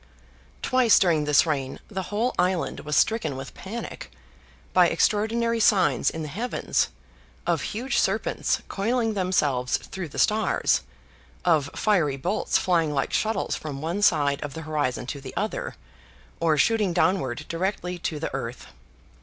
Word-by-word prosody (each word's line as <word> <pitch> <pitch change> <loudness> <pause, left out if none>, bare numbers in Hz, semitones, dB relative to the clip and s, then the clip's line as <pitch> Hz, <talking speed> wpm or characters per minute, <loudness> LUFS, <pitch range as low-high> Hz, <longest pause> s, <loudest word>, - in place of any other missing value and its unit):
Twice 255 -4 +5
during 165 -5 +3
this 150 +1 +5
reign 140 -4 -2
the 190 -3 -4
whole 225 +5 0
island 180 -1 0
was 150 0 -3
stricken 160 - +1
with 135 0 -7
panic, 215 +6 -7 0.6
by - - +6
extraordinary 230 +2 +1
signs 210 -3 +3
in 160 - -5
the - - -4
heavens, 220 - -1 0.6
of - - +1
huge 250 +5 -1
serpents - - 0
coiling 225 +2 0
themselves 150 -10 +1
through 190 -3 -7
the - - -10
stars, 215 +1 +2 0.6
of 155 -5 +3
fiery 170 -10 +2
bolts 185 +10 0
flying 165 -4 +1
like 140 -2 -1
shuttles 220 +1 0
from 145 -3 -6
one 170 +7 -2
side 145 -7 +3
of 145 -2 -5
the 160 - -6
horizon 145 -5 -1
to 140 +2 -6
the 135 - -9
other, 485 - -2 0.6
or 160 -2 +2
shooting 210 +3 +2
downward 145 -9 +1
directly 180 0 -2
to 155 -2 -3
the 160 - -4
earth. 125 -2 -5
175 Hz, 145 wpm, -25 LUFS, 145-210 Hz, 0.6 s, by